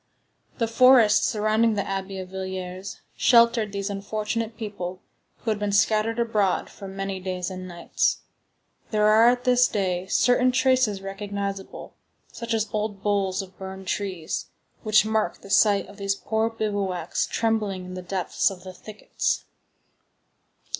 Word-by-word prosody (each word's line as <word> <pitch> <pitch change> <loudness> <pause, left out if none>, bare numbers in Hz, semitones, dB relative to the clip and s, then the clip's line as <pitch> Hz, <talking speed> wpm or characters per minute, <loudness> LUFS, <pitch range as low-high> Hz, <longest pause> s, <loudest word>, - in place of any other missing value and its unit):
The 230 - 0
forest 230 -2 +6
surrounding 215 +1 +2
the 200 - -2
Abbey 195 0 -4
of 185 -1 -6
Villiers 190 0 -6
sheltered 235 -3 +4
these 200 -1 -3
unfortunate 215 +3 -3
people 185 -5 -5 0.4
who 225 - 0
had 210 - -2
been 205 -1 -1
scattered 215 +3 +2
abroad, 215 -5 0
for 200 - -10
many 195 0 -4
days 185 0 -4
and 185 0 -7
nights. 170 -1 -1 0.7
There 210 -1 +2
are 220 +2 +6
at 245 0 0
this 250 -1 +4
day 185 -3 -1
certain 250 +4 +3
traces 255 -6 +2
recognizable, 200 0 -5 0.4
such 235 -1 -3
as 220 -1 0
old 210 -2 -3
boles 200 -2 0
of 190 -1 -14
burned 190 0 -7
trees, 185 -5 -3 0.3
which 215 -1 +4
mark 220 0 -1
the 195 - -11
site 205 -2 +4
of 200 - -14
these 195 -1 -1
poor 220 +2 -1
bivouacs 205 -5 -2
trembling 210 -5 -1
in 185 - -8
the 185 - -5
depths 180 +2 0
of 185 -2 -10
the 185 -1 -9
thickets. 210 +3 -3
205 Hz, 145 wpm, -25 LUFS, 190-220 Hz, 0.7 s, forest